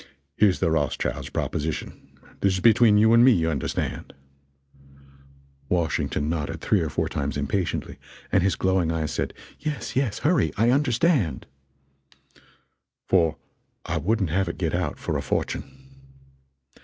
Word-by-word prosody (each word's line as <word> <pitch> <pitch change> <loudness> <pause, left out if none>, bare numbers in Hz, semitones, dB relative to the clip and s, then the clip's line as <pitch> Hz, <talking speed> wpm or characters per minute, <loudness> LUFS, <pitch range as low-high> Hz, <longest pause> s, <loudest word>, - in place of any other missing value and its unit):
Here's 100 0 +3
the 80 - +1
Rothschild's 75 -3 -1
proposition 75 +1 -3 0.5
this 100 -1 +2
is - - -2
between 110 0 +5
you 110 +2 +5
and 115 +1 +7
me, 130 - +7
you 80 -4 +1
understand 70 -4 -3 0.8
" 70 0 -27
Washington 80 -3 0
nodded 80 -2 -3
three - - +1
or - - -2
four - - -1
times 70 0 -3
impatiently, 75 +6 -2 0.3
and 95 - +4
his 95 +1 +1
glowing 95 -3 +1
eyes 80 -2 -2
said, - - -2 0.3
"Yes, 150 -2 -4
yes 130 -6 0
hurry 145 - +1
I 115 +3 +3
understand 130 - +1 0.8
" 65 - -33
"for 85 -4 +3 0.5
I - - -2
wouldn't 100 -4 0
have 95 +3 +1
it - - -5
get 85 -4 -1
out 85 -4 -1
for - - -2
a - - -2
fortune. - - -2
90 Hz, 145 wpm, -25 LUFS, 75-110 Hz, 0.8 s, and